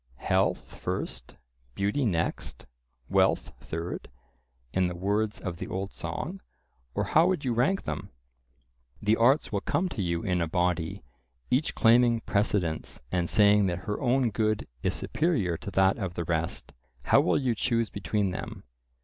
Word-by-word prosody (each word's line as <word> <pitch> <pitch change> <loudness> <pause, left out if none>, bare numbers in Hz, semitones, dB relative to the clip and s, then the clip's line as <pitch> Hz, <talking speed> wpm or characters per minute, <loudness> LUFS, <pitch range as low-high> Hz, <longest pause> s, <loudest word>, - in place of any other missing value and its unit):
"Health - - 0
first, - - -5 0.4
beauty 105 +8 0
next, 85 - -2 0.4
wealth - - +2
third," 85 +2 -5 0.6
in 95 -1 +2
the 90 - -4
words 105 +4 0
of 90 -3 -5
the - - -5
old 95 +1 -4
song, 155 - -5 0.5
or - - +1
how 160 +3 +4
would 185 -7 0
you 125 - +1
rank 135 +12 +1
them? - - -4 0.9
The 105 +1 +3
arts 130 +7 +3
will 100 -2 -1
come 180 - 0
to 110 - -4
you 85 -2 -1
in 90 -4 0
a 85 - 0
body, 90 -1 -1 0.5
each 135 +6 +1
claiming 115 0 +5
precedence 100 -7 0
and 85 -2 0
saying 105 -1 +5
that 85 -1 -1
her 105 - -3
own 125 -2 +2
good 110 -1 0
is - - 0
superior 130 - 0
to 115 - -7
that 95 +2 +3
of 95 -4 -3
the 85 - -2
rest—How 65 -6 -1
will - - +2
you 130 -4 +1
choose 115 0 0
between 100 0 -1
them? 90 - -6
100 Hz, 155 wpm, -28 LUFS, 90-120 Hz, 0.9 s, claiming